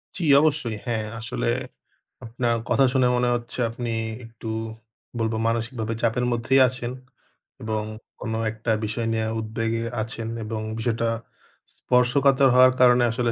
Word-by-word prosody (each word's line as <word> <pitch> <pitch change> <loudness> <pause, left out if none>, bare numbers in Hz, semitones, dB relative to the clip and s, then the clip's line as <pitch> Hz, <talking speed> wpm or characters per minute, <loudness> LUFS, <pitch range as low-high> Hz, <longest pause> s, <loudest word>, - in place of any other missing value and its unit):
জি, 185 - -3 0.2
অবশ্যই। 145 -7 +1
হ্যাঁ, 115 -3 -1
আসলে - - -3 0.8
আপনার 115 +1 0
কথা 135 - +4
শুনে 130 -2 +4
মনে 125 0 +1
হচ্ছে 120 +1 -6
আপনি 120 +1 -5 0.4
একটু 115 0 -11 0.7
বলবো 110 0 0
মানসিকভাবে 115 0 -2
চাপের 120 +1 +1
মধ্যেই 120 +3 +3
আছেন। 125 -1 -4 0.7
এবং 110 -1 -2 0.4
কোন 110 - -4 0.2
একটা 110 +1 -3
বিষয় 110 +2 -2
নিয়ে 110 0 0
উদ্বেগে 115 +1 -2 0.2
আছেন 110 +1 -4 0.2
এবং 110 0 -4 0.2
বিষয়টা 115 0 0 0.7
স্পর্শকাতর 135 +2 +3
হওয়ার 130 0 +7
কারণে 125 -1 +6
আসলে 120 0 0
115 Hz, 130 wpm, -24 LUFS, 110-125 Hz, 0.8 s, হওয়ার